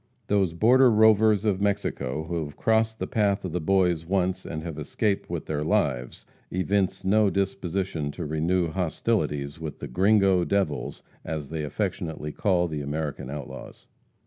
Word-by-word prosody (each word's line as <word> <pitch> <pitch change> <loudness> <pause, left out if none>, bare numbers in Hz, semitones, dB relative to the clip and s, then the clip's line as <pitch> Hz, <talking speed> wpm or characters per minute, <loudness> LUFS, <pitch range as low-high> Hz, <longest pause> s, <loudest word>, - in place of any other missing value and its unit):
Those 95 -5 +1
border 125 +7 +5
rovers 110 -1 +4
of 100 -3 +1
Mexico 80 -8 -1
who 85 0 -3
have 75 -1 -9
crossed 110 0 +2
the - - -3
path 100 -2 0
of 90 - -4
the 90 +1 -2
boys 90 -1 +2
once 95 +1 -1
and 80 -1 -5
have 80 -3 -6
escaped 100 +7 -1
with - - -4
their 75 -1 -2
lives, 70 -9 -1 0.2
evince 95 +1 0
no 105 +1 +4
disposition 95 -4 -2
to - - -5
renew 80 +3 0
hostilities 80 -5 -1
with 80 -3 -6
the - - -6
"gringo 95 - +3
devils," 100 +1 -1 0.2
as 75 -3 -5
they 80 -2 -3
affectionately 80 -2 -3
call 90 0 +1
the 75 -3 -4
American 75 -2 -4
outlaws. 70 -2 -8
90 Hz, 155 wpm, -26 LUFS, 80-100 Hz, 0.2 s, border